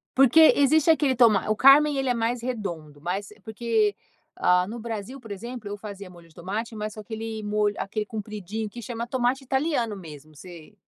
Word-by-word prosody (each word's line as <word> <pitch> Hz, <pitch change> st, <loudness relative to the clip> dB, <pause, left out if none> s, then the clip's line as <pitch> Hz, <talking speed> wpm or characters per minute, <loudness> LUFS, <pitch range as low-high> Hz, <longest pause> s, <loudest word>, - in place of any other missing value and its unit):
Porque 275 Hz, +5 st, +7 dB
existe 305 Hz, +3 st, +3 dB
aquele 290 Hz, -4 st, +2 dB
toma 225 Hz, -5 st, +4 dB
o 215 Hz, -, +2 dB
carmen 280 Hz, +4 st, +6 dB
ele 270 Hz, -1 st, 0 dB
é -, -, +3 dB
mais 235 Hz, +1 st, -1 dB
redondo. 175 Hz, -, -5 dB
Mas 185 Hz, +5 st, -3 dB, 0.2 s
porque, 220 Hz, -2 st, 0 dB, 0.4 s
ah, 180 Hz, 0 st, +2 dB
no 230 Hz, +3 st, -6 dB
Brasil, 230 Hz, +3 st, -6 dB
por 225 Hz, -4 st, -12 dB
exemplo, 235 Hz, +2 st, -7 dB
eu 205 Hz, -, -5 dB
fazia 200 Hz, -2 st, -9 dB
molho 175 Hz, -2 st, -16 dB
de 160 Hz, -, -24 dB
tomate, 210 Hz, +6 st, -5 dB
mas 215 Hz, 0 st, -5 dB
com -, -, -9 dB
aquele 220 Hz, 0 st, -6 dB
molho 210 Hz, 0 st, 0 dB
aquele 210 Hz, +2 st, -3 dB
compridinho 215 Hz, -1 st, -5 dB
que 240 Hz, -, -9 dB
chama 235 Hz, +1 st, -5 dB
tomate 255 Hz, +2 st, 0 dB
italiano 265 Hz, -4 st, -1 dB
mesmo, 155 Hz, -4 st, -12 dB
você 170 Hz, +3 st, -12 dB
220 Hz, 190 wpm, -25 LUFS, 200-245 Hz, 0.4 s, Porque